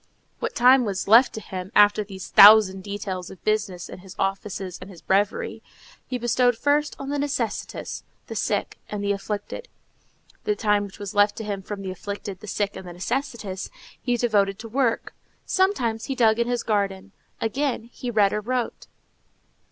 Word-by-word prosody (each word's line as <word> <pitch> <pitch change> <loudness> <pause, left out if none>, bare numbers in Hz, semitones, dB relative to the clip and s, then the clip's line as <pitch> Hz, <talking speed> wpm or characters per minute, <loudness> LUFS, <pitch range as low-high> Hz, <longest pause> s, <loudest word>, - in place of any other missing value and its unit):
What - - -3
time 255 +1 +6
was 195 -4 -2
left 230 +5 +7
to - - -5
him, 190 -2 -7
after 205 0 +6
these 195 -2 -9
thousand 200 -2 +8
details 195 -2 -5
of 190 - -13
business, 205 -5 -1
and - - -10
his 190 0 -12
offices 195 -1 -3
and 185 - -9
his 180 -4 -12
breviary, 195 +3 0 0.5
he 255 - -2
bestowed 245 0 +2
first 290 +3 +1
on 275 - -6
the 290 0 -1
necessitous, 275 -6 -3 0.2
the - - -7
sick, - - -1
and 205 -1 -4
the 200 - +1
afflicted; 205 - -4 0.8
the 420 -1 0
time 210 - +1
which 195 - -12
was 200 -1 -6
left 205 0 +4
to 225 - -6
him 200 -2 -3
from 195 +1 -6
the 190 - -4
afflicted, 200 0 -6
the 215 - -11
sick, 200 +1 -2
and 190 -1 -8
the 175 - -8
necessitous, 210 -1 -3 0.3
he 245 -2 0
devoted 205 -5 +2
to 225 - -8
work. 235 0 0 0.3
Sometimes 245 - +1
he 270 - -3
dug 225 -3 +3
in 235 - +1
his 245 -1 -1
garden; 200 -2 -1 0.3
again, 260 +1 -1
he 250 - -5
read 210 -4 +3
or 210 - -1
wrote. 245 +2 -3
210 Hz, 180 wpm, -24 LUFS, 195-240 Hz, 0.8 s, thousand